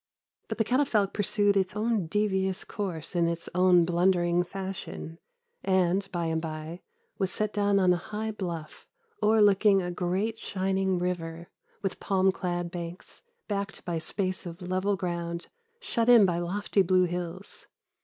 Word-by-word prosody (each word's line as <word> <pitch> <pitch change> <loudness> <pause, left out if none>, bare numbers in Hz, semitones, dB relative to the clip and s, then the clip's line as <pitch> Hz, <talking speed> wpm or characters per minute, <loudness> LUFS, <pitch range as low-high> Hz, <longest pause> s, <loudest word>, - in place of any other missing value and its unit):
But - - -4
the 225 - +3
catafalque 225 -5 +1
pursued 205 0 +2
its 190 -1 +1
own 215 -4 0
devious 190 0 0
course 180 -5 -5
in 170 -1 +3
its 170 0 -3
own 180 -1 +5
blundering 175 0 +2
fashion, 185 -2 -6 0.4
and, 190 +1 +1
by 175 -2 -2
and 160 0 0
by, 160 +2 -6 0.4
was 190 -2 +1
set 215 0 -1
down 205 -1 +2
on 185 -2 +4
a - - +1
high 215 +5 -4
bluff, 170 -7 -6 0.3
o'erlooking 205 -2 +5
a 180 - -3
great 190 +6 -1
shining 190 -1 0
river, 170 -2 -3 0.3
with 195 - -2
palm 190 -1 +2
clad 175 -2 -3
banks, 170 0 -7 0.3
backed 200 -1 -3
by 175 - -3
a 165 - -1
space 185 0 -2
of 170 +1 -8
level 185 +2 0
ground 170 -2 -4 0.3
shut 235 - 0
in 235 -4 +8
by 175 -2 +1
lofty 195 +3 0
blue 185 0 +4
hills. 175 +2 -5
185 Hz, 155 wpm, -28 LUFS, 175-200 Hz, 0.4 s, in